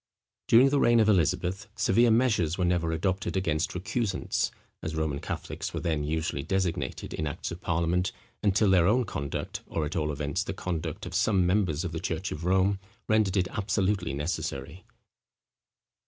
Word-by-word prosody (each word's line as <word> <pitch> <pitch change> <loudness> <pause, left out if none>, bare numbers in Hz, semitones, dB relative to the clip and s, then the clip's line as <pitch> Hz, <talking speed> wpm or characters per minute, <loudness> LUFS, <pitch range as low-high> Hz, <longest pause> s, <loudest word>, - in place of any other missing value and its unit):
During 125 +4 +7
the 145 0 +2
reign 120 -2 +5
of 110 - +4
Elizabeth, 95 +1 +1
severe 120 +5 +4
measures 110 -9 +2
were 90 - +1
never 85 -2 +1
adopted 95 +4 -1
against 80 -3 0
recusants, 95 +2 -1 0.3
as 80 - -4
Roman 80 -3 -1
Catholics - - -5
were - - -1
then 80 -3 -1
usually 80 -1 -1
designated 95 0 -2
in 80 - -2
acts 75 - -4
of 85 +2 -7
parliament, 85 +2 0 0.3
until 100 0 +3
their 90 -2 +5
own 125 +5 +4
conduct, 70 -8 -4
or 80 - -2
at 75 - -5
all 75 -2 0
events, 75 0 -2
the - - -4
conduct 80 -3 -4
of 90 - -7
some 95 -1 +3
members 90 -4 +1
of 85 - -3
the 80 - -3
church 95 -1 -3
of 80 +3 -5
Rome, 95 +2 +3 0.3
rendered 105 -3 +2
it 90 -1 +2
absolutely 100 -5 0
necessary. 75 +1 -4
90 Hz, 170 wpm, -28 LUFS, 80-100 Hz, 0.3 s, During